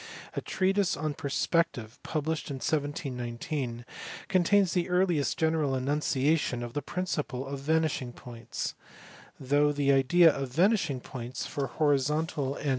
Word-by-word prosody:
A - - -2
treatise 190 0 +1
on 155 0 -2
perspective, 140 -4 -1
published 155 0 -2
in 140 - -3
1719, 130 -3 -3 0.4
contains 190 0 +3
the 180 0 0
earliest 180 -5 +2
general 160 -4 +1
enunciation 140 -1 +1
of 120 -1 -6
the 145 - -1
principle 150 -5 -3
of 140 0 -5
vanishing 155 -3 0
points; 120 -2 -6 0.7
though 145 +2 +3
the 145 -1 +2
idea 155 +5 +5
of 135 -1 -3
vanishing 170 - +2
points 125 0 -6
for 140 -2 -2
horizontal 145 +1 +1
and 135 - -2
390 - - -8
COTES. 145 - 0
145 Hz, 135 wpm, -29 LUFS, 130-160 Hz, 0.7 s, idea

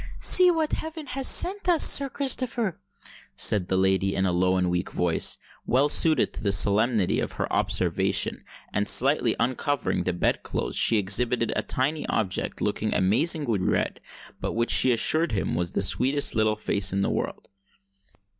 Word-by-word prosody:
"See 365 -1 +5
what 320 -3 -1
heaven 320 -1 -6
has 265 0 -1
sent 380 +1 +3
us, 335 -3 +4
Sir 275 -1 +4
Christopher!" 250 - -2 0.6
said 100 -4 +2
the 95 - -1
lady, 95 +1 0
in 95 - 0
a 90 - 0
low 90 +1 0
and 90 -1 0
weak 90 +1 -3
voice, 85 -2 +1 0.3
well 135 +4 +1
suited 155 -2 +3
to - - -8
the 100 -3 -1
solemnity 105 +2 +1
of - - -4
her - - -3
observation; - - -1 0.3
and, 105 0 +1
slightly 130 -3 +2
uncovering 130 - -2
the 90 - -1
bed 90 - -1
clothes, - - -5
she 115 - +3
exhibited 115 +4 0
a - - -1
tiny 145 +4 -2
object, 100 -4 -3
looking - - -2
amazingly 120 - +1
red, 90 - -2 0.4
but - - -4
which 115 +1 -1
she 130 - +3
assured 155 +6 +1
him 95 - -2
was 85 +1 -3
"the - - -1
sweetest 135 +8 +2
little 110 -1 0
face 100 -2 -1
in 100 +1 -1
the - - -1
world." - - -5
115 Hz, 170 wpm, -24 LUFS, 95-155 Hz, 0.6 s, See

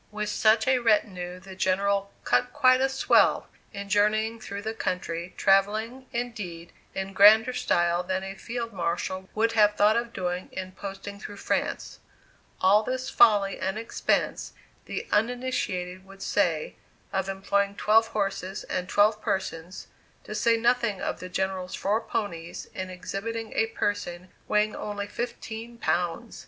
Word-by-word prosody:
With 210 0 -3
such 220 +2 +3
a 260 -1 +4
retinue 185 -6 +1
the 190 +1 -11
General 200 +1 +1
"cut 125 - +2
quite 255 -3 +5
a 270 - +3
swell" 270 - +3 0.2
in 200 0 -6
journeying 215 +3 +2
through 200 -2 -6
the 220 +1 -2
country, 180 -4 -3
travelling, 215 +6 +2
indeed, 210 -9 -5 0.2
in 190 0 -4
grander 220 +5 +7
style 175 -7 +1
than 185 +1 -2
a 195 0 -5
Field 230 +3 -5
Marshal 185 +1 -2
would 225 +1 +2
have 210 -2 +4
thought 210 +1 +4
of 235 0 -1
doing 180 -3 -3
in 185 0 -6
posting 200 +1 -7
through 205 -1 -8
France. - - -2 0.6
All 195 +3 +5
this 255 +3 -3
folly 200 -3 +5
and 190 +2 -2
expense, 225 +1 -1 0.3
the - - -5
uninitiated 210 -6 -1
would 195 0 -12
say, 170 -7 0 0.4
of 190 0 -1
employing 200 +1 0
twelve 220 +2 +4
horses 195 -3 -3
and 180 0 -3
twelve 210 +1 +3
persons, 180 -2 -3 0.4
to - - -7
say 230 -1 +3
nothing 235 -3 +1
of - - -3
the 185 - -7
General's 185 0 -2
four 210 +3 0
ponies, 170 -7 -4
in 185 0 -5
exhibiting 200 +5 -5
a 225 - +2
person 185 -5 -3 0.2
weighing 210 0 +2
only 205 -1 -4
fifteen 235 +1 -6
pounds! 180 +3 -1
200 Hz, 145 wpm, -27 LUFS, 185-225 Hz, 0.6 s, grander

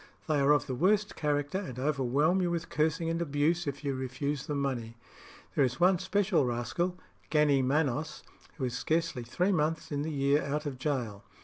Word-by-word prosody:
They 155 -2 +2
are 140 +1 +4
of 150 - +3
the 130 - -4
worst 200 +9 +2
character, 145 +3 -1
and 130 - -7
overwhelm 145 +5 +1
you 175 - +1
with 170 -1 -3
cursing 155 +2 0
and 165 +1 -1
abuse 155 +2 +1
if 140 +1 -4
you 140 -1 -1
refuse 135 +2 -3
them 145 -1 -1
money. 120 -5 -3 0.6
There 145 - +3
is 130 +2 -1
one 180 0 +4
special 190 -3 +2
rascal, 125 +9 -1 0.3
Gannee 150 -3 +4
Manos, 145 +2 0 0.3
who 140 - -4
is 125 -1 -3
scarcely 165 -5 0
three 175 +12 0
months 160 -3 0
in 145 -1 -1
the 155 - -2
year 140 0 +2
out 150 +2 -2
of 135 -3 -4
gaol. 125 -8 -2
145 Hz, 190 wpm, -30 LUFS, 135-165 Hz, 0.6 s, are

